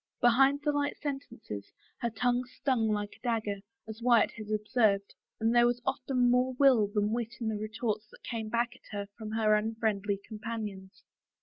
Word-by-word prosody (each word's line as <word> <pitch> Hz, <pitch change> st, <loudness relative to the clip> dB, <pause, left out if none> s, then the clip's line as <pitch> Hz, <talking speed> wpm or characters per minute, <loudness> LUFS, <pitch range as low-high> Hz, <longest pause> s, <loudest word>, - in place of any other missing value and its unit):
Behind 270 Hz, +3 st, +5 dB
the 295 Hz, -, +2 dB
light 290 Hz, 0 st, -1 dB
sentences 270 Hz, -, -6 dB, 0.3 s
her 235 Hz, -, 0 dB
tongue 245 Hz, +3 st, +1 dB
stung 255 Hz, -2 st, 0 dB
like 210 Hz, -1 st, -2 dB
a -, -, -39 dB
dagger, 225 Hz, -4 st, 0 dB, 0.3 s
as 220 Hz, +1 st, -8 dB
Wyatt 235 Hz, -2 st, +4 dB
had 215 Hz, -2 st, -9 dB
observed, 210 Hz, -2 st, +1 dB, 0.3 s
and 225 Hz, +1 st, +2 dB
there 240 Hz, 0 st, +6 dB
was 240 Hz, 0 st, 0 dB
often 250 Hz, -2 st, +1 dB
more 250 Hz, +1 st, +3 dB
will 250 Hz, -5 st, +5 dB
than 210 Hz, +1 st, 0 dB
wit 235 Hz, 0 st, -2 dB
in 225 Hz, -2 st, -1 dB
the 220 Hz, -, -1 dB
retorts 215 Hz, 0 st, -3 dB
that -, -, -18 dB
came 225 Hz, -2 st, -4 dB
back 235 Hz, +1 st, 0 dB
at 205 Hz, -, -9 dB
her 200 Hz, -, -2 dB
from 215 Hz, -1 st, -7 dB
her 220 Hz, -1 st, +3 dB
unfriendly 210 Hz, -2 st, 0 dB
companions. 210 Hz, -3 st, -6 dB
225 Hz, 180 wpm, -30 LUFS, 210-245 Hz, 0.3 s, there